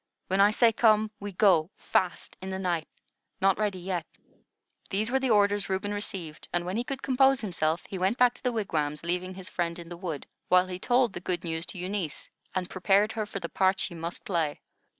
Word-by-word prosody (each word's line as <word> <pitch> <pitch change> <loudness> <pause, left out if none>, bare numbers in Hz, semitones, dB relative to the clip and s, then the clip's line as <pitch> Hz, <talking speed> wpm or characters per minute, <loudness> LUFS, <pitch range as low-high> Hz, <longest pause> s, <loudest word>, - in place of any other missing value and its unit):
When 190 +1 +3
I 200 - +7
say 230 +2 +4
come, 215 -1 +4
we 205 0 -5
go 180 -4 +4
fast 180 -2 -1
in 190 - -5
the 190 - -3
night. 175 -4 -1 0.5
Not 195 0 +3
ready 205 -3 0
yet." 180 -3 -3 0.8
These 215 +4 0
were 265 - +3
the 265 -1 0
orders 205 -2 +3
Reuben 195 +2 -1
received, 190 -7 -5
and, 175 0 0
when 185 +2 -3
he 235 - 0
could 270 +1 -5
compose 270 0 +4
himself, 165 -5 -1
he 190 - -5
went 190 +6 +1
back 250 -1 +5
to - - -15
the 250 - +1
wigwams, 155 -9 -1
leaving 180 +2 -2
his 190 -1 -6
friend 170 -3 -2
in 170 -1 -9
the 175 - -7
wood, 170 -6 -5 0.2
while 180 0 +5
he 185 -1 -6
told 245 0 +2
the - - -5
good 180 0 -2
news 165 0 -3
to - - -6
Eunice, 180 -3 -3 0.2
and 185 -1 -1
prepared 195 +3 +2
her 215 -2 -3
for 200 - -5
the 170 - -4
part 190 +2 +2
she - - -1
must 170 +1 -6
play. 165 -6 -1
190 Hz, 215 wpm, -28 LUFS, 175-210 Hz, 0.8 s, I